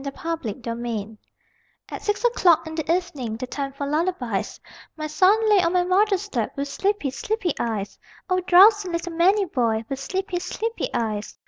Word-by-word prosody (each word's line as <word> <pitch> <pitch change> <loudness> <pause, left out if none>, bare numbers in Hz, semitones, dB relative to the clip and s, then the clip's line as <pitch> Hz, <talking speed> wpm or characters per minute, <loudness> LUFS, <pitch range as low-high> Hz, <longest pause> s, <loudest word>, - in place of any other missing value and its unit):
TO 280 - -3
A 330 +4 -3 0.2
GRANDMOTHER 230 -3 -5 0.7
At - - -6
six 415 +3 -1
o'clock 360 -9 +4
in 320 - -7
the 315 0 -2
evening, 295 -11 -2
The 255 - -4
time 275 +2 -4
for 275 +1 -5
lullabies, 285 - -2 0.4
My 310 - -4
son 390 +8 +3
lay 415 -3 +5
on 340 0 +1
my 360 -1 +3
mother's 390 0 +1
lap 230 -3 -1
With 280 0 -3
sleepy, 395 -8 -1
sleepy 375 +3 -2
eyes! 215 -4 -3 0.3
(O 370 0 +1
drowsy 380 +2 +6
little 340 0 -3
manny 385 +5 +3
boy, 230 -8 0
_With 270 - -3
sleepy, 370 +5 -3
sleepy 450 +5 -3
eyes! 215 -2 -3
335 Hz, 170 wpm, -23 LUFS, 255-375 Hz, 0.7 s, drowsy